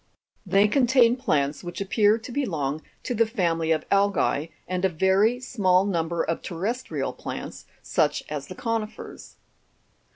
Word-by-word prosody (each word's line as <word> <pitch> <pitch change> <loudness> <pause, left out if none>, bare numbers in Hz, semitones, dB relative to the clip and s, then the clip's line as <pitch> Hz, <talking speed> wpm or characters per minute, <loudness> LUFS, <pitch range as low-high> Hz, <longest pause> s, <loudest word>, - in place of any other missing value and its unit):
They 200 +2 +4
contain 245 0 +4
plants 150 - 0
which 175 0 -6
appear 205 +2 +3
to 230 +2 -9
belong 155 - -2 0.2
to 250 - -2
the 230 -1 +2
family 165 -7 0
of 155 -1 +1
algae, 195 -6 +2 0.2
and 185 0 -2
a 190 - +4
very 190 +7 +2
small 195 -7 +2
number 170 -3 -1
of 165 - -2
terrestrial 205 +9 -3
plants, - - -7 0.2
such - - +1
as - - -5
the - - -8
co'nifers. 225 -2 -5
195 Hz, 140 wpm, -25 LUFS, 165-230 Hz, 0.2 s, They